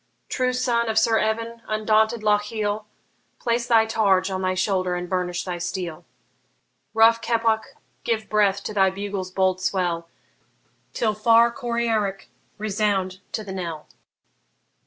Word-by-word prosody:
True 255 -1 0
son 240 -2 0
of 220 - -1
Sir 225 0 +4
Evan, 230 +1 -2
undaunted 215 +1 +1
Lochiel, 210 0 0 0.5
Place 235 0 -1
thy 225 -2 +5
targe 200 -4 +2
on 190 0 -2
thy 185 0 0
shoulder 185 -2 0
and 180 0 -4
burnish 180 -1 -2
thy 180 -2 -4
steel! 175 -2 -4 0.9
Rough 230 +1 +5
Keppoch, 225 -1 0 0.3
give 220 -2 -1
breath 200 -2 +2
to - - -5
thy 195 -2 +4
bugle's 195 -1 -4
bold 185 0 +1
swell, 175 -3 -1 0.8
Till 220 -2 0
far 230 +2 +4
Coryarrick 230 -6 -1 0.3
resound 205 -3 -1
to 215 - -2
the 195 -2 -7
knell! 170 -5 -5
210 Hz, 135 wpm, -23 LUFS, 185-225 Hz, 0.9 s, thy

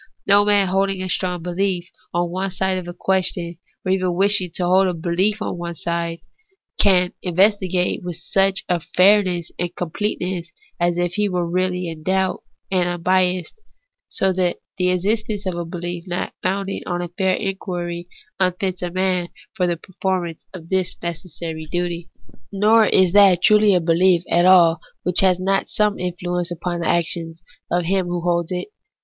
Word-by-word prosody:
No 200 +1 +5
man 205 -2 +3
holding 195 0 0
a - - -3
strong 180 -2 -1
belief 180 0 -1 0.2
on 175 0 -1
one 190 +2 -2
side 190 0 -1
of 180 - -9
a - - -5
question, 180 -3 0 0.3
or 185 - +1
even 185 -2 0
wishing 195 -1 +2
to 180 - +1
hold 185 +2 +4
a 180 - -1
belief 185 +6 0
on 175 - -4
one 170 0 -5
side, 170 0 -3 0.6
can 180 -3 +4
investigate 185 0 +2
it - - -17
with 175 -1 -5
such 195 +3 +1 0.3
fairness 185 -3 +4
and 175 0 -3
completeness 180 -1 -3 0.3
as 175 0 +1
if 175 -1 0
he 210 +1 +1
were 180 -2 -1
really 180 0 -1
in 165 -2 -7
doubt 190 +2 0 0.3
and 180 -2 +2
unbiassed; 180 - 0 0.5
so 190 -1 +1
that 180 -1 0 0.2
the' 180 0 +3
existence 205 +3 -1
of 185 - -1
a 170 0 -4
belief 175 0 -5
not 175 0 -3
founded 195 +1 -2
on 175 -1 -2
fair 185 +2 0
inquiry 175 -3 -4 0.3
unfits 185 0 0
a 180 - -2
man 185 -1 0 0.3
for 185 -5 0
the 170 -1 -1
performance 180 -2 -3
of 170 -3 -11
this 190 -2 0
necessary 165 -2 -5
duty. 175 0 -3 0.4
Nor 215 +2 +4
is 185 -2 +3
that 195 -3 +6
truly 210 -2 +5
a - - +4
belief 170 +1 +3
at 175 +1 +4
all 170 -3 +6 0.2
which 180 0 +2
has 185 -2 +4
not 195 +1 0
some 210 -1 0
influence 180 0 -3
upon 175 0 -3
the 170 - -2
actions 165 0 -1 0.3
of 175 -1 0
him 190 0 0
who 175 0 -2
holds 170 -1 0
it. 180 - -3
180 Hz, 170 wpm, -21 LUFS, 175-190 Hz, 0.6 s, that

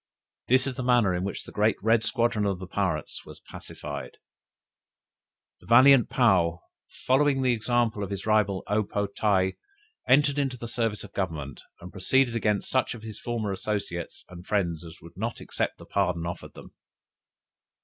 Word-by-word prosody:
"This 130 +1 +4
is 135 -3 -3
the 130 - -3
manner 120 -6 +3
in 90 0 -2
which 100 - -4
the - - -12
great 105 +1 +2
red 110 +2 +2
squadron 115 -4 0
of 100 -2 0
the 95 - -7
pirates 90 -5 -2
was - - -12
pacified." - - -8 1.4
The - - -19
valiant 130 +1 +7
Paou, 90 -9 +3 0.5
following 135 0 +3
the 125 -1 +3
example 115 -1 0
of 100 - -4
his 100 -1 -5
rival 105 -3 +2
O 105 +1 +1
po 100 0 -2
tae, 100 -2 0 0.5
entered 145 +2 +4
into 135 -3 -1
the 115 - -7
service 115 -3 -2
of 105 - -12
Government, 75 -9 -4 0.2
and 90 +1 -9
proceeded 120 +6 +1
against 105 -3 0
such 130 -1 +1
of 110 - -12
his 110 -2 -8
former 115 -4 -3
associates 95 -3 -4
and 90 -1 -11
friends 85 -6 -1
as 80 -1 -11
would 85 - -13
not 115 +4 -3
accept - - -3
the - - -13
pardon 90 -4 0
offered 85 0 -7
them. - - -13
105 Hz, 170 wpm, -27 LUFS, 95-120 Hz, 1.4 s, valiant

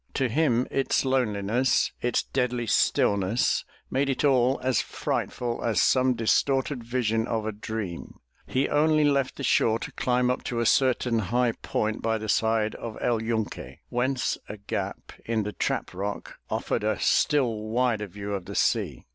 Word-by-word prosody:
To 135 - +1
him 125 -2 +2
its 135 0 +1
loneliness, 125 -1 +1
its 120 0 +1
deadly 125 -2 -1
stillness, 100 0 +2 0.3
made 135 +1 +1
it 135 - -1
all 130 -1 +3
as 130 -3 +2
frightful 120 -1 -3
as 115 -2 +1
some 130 -1 +3
distorted 130 +3 +1
vision 115 -2 0
of 110 -2 -2
a 110 - -1
dream. 105 -4 -6 0.3
He 130 +2 +1
only 155 +1 +3
left 140 -3 +1
the 140 - -7
shore 115 -3 +3
to - - -7
climb 125 0 +1
up 125 - -3
to 120 - -2
a 115 - +1
certain 125 -2 +2
high 120 +4 +1
point 110 0 -2
by 115 0 0
the 110 0 -6
side 110 0 +2
of 115 -2 -7
El 115 -2 0
Yunque, 110 - -3
whence 130 +2 0
a 105 - -6
gap 100 - -5
in 110 -2 -1
the 105 0 -4
trap - - -2
rock 100 +3 -5
offered - - -1
a - - 0
still 125 -7 +2
wider 115 -2 0
view 100 +2 -6
of 95 -3 -4
the - - -7
sea. - - 0
120 Hz, 165 wpm, -26 LUFS, 110-130 Hz, 0.3 s, all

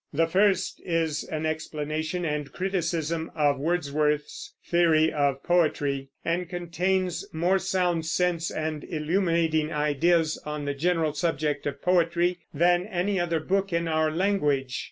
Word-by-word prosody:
The 165 +3 +2
first 190 +2 +1
is 165 -3 -1
an 155 0 -4
explanation 155 +2 -3
and 150 -3 -2
criticism 165 -3 -2
of 145 -3 +2
Wordsworth's 150 -2 -1
theory 165 -2 +3
of 140 -2 0
poetry, 145 -6 +1 0.2
and 175 +1 -1
contains 180 +1 -1
more 175 +4 +2
sound 180 -4 0
sense 175 -1 0
and 155 -1 -3
illuminating 165 -1 0
ideas 155 +2 +1
on 150 -1 -4
the 140 - -1
general 160 +1 0
subject 150 -2 -1
of 145 - -5
poetry 175 0 +2
than 175 +4 +2
any 190 0 -1
other 170 -2 0
book 195 +4 0
in 170 0 0
our 155 -1 +2
language. 150 -8 0
165 Hz, 135 wpm, -26 LUFS, 150-175 Hz, 0.2 s, theory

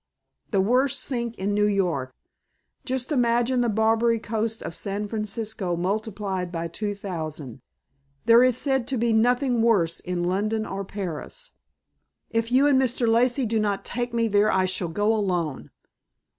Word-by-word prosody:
"The 195 -3 +2
worst 255 +6 +2
sink 235 -3 -2
in 200 +2 -2
New 210 0 +3
York. 175 -10 0 0.7
Just 260 0 -2
imagine 245 -1 +2
the 240 - +1
Barbary 225 +2 +2
Coast 225 +1 -2
of - - -5
San 200 +4 -3
Francisco 215 -3 -3
multiplied 195 -1 -2
by 170 -1 -3
two 205 +4 -3
thousand. 155 - -6 0.6
There 235 +1 +7
is 255 -2 +3
said 265 -3 0
to 265 - -1
be 235 0 +1
nothing 245 +2 +2
worse 200 -8 +2
in 180 -1 -3
London 210 +5 0
or 195 -1 -4
Paris." 195 - -6 0.8
"If 230 +1 -1
you 265 +3 +5
and 275 -2 +4
Mr. 245 -2 +1
Lacey 245 +3 +3
do 225 0 0
not 205 -2 -1
take 240 0 -2
me 230 -1 +1
there 205 0 +3
I 190 0 +2
shall 185 -1 -1
go 205 +6 +1
alone." 175 -9 -2
220 Hz, 155 wpm, -25 LUFS, 190-235 Hz, 0.8 s, There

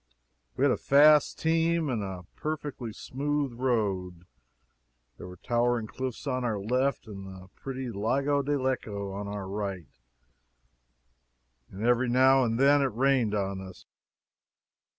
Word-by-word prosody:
We 130 - +1
had 140 - +4
a - - +1
fast 150 +1 +5
team 165 0 +1
and 120 -5 -1
a 95 -3 -6
perfectly 145 -6 -4
smooth 140 +4 -2
road. 100 -8 -1 0.9
There - - -9
were 90 0 -11
towering 120 +1 0
cliffs 130 +4 -6
on 130 -2 -1
our 115 -4 -1
left, 125 +7 0
and 100 -3 -9
the 95 0 -11
pretty 130 +2 -6
Lago 135 +8 0
di 145 +1 -1
Lecco 110 -8 -2
on 100 +1 -5
our 100 -1 -5
right, 100 -3 -4 1.8
and 100 +4 -5
every 120 +1 +3
now 130 +2 +5
and 115 -1 -1
then 140 +1 +5
it - - +3
rained 125 -4 +2
on 100 -1 -2
us. 95 -1 -11
120 Hz, 140 wpm, -28 LUFS, 100-135 Hz, 1.8 s, fast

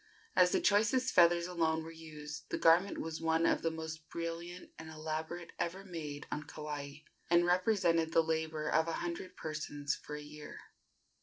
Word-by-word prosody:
As 180 -1 +6
the - - +3
choicest 225 +6 +3
feathers 170 -1 +6
alone 160 -2 0
were 165 - -8
used, 155 -2 -9
the - - -1
garment 175 +4 +5
was 160 0 -4
one 165 0 +2
of - - +3
the 165 - +1
most 160 -1 -6
brilliant 170 +2 -5
and 160 0 -8
elaborate 160 +2 -4
ever 190 +3 -2
made 150 -5 -6
on 150 - -2
Kauai, 150 -1 -6 0.3
and 175 0 +5
represented 175 -3 +3
the 165 0 +5
labor 160 -1 -1
of 160 +2 +3
a 165 - -1
hundred 175 +2 -4
persons 145 -2 -3
for 150 - -8
a 150 - -7
year. 150 0 -9
160 Hz, 170 wpm, -34 LUFS, 155-175 Hz, 0.3 s, As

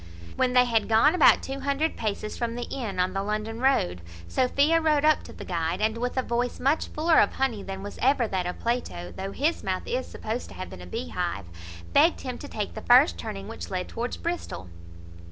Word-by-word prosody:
When 255 -1 +1
they 250 0 +6
had 225 -3 +1
gone 230 +8 +5
about 365 - +6
two 270 +1 -4
hundred 280 +3 0
paces 215 -1 -3
from 235 -1 -2
the 245 - -3
inn 215 -8 -4
on 180 +1 +1
the 195 - -1
London 215 +2 -3
road, 90 - +2 0.3
Sophia 285 - +3
rode 305 -2 +3
up 310 0 +4
to - - -10
the - - -9
guide, 170 0 -1
and, 220 +1 +1
with 245 +2 -2
a 260 - +2
voice 245 +1 -1
much 280 +5 +1
fuller 320 +2 +3
of - - +3
honey 250 -6 -1
than 195 0 -6
was 205 - -8
ever 260 -2 +3
that 185 -3 -1
of 180 - -4
Plato, 90 - -3
though 195 +1 -4
his 305 +10 0
mouth 185 -1 -2
is 255 +1 -2
supposed 225 +3 -4
to - - -12
have 185 - -7
been 90 - -9
a 90 - -10
bee 85 -1 -4
hive, 90 +4 -3 0.5
begged - - +5
him - - -5
to - - -8
take - - -4
the - - -6
first 85 -1 +5
turning 95 +3 -6
which 85 0 -7
led 180 - -3
towards 235 +2 -4
Bristol. 330 - -4
230 Hz, 225 wpm, -26 LUFS, 185-270 Hz, 0.5 s, they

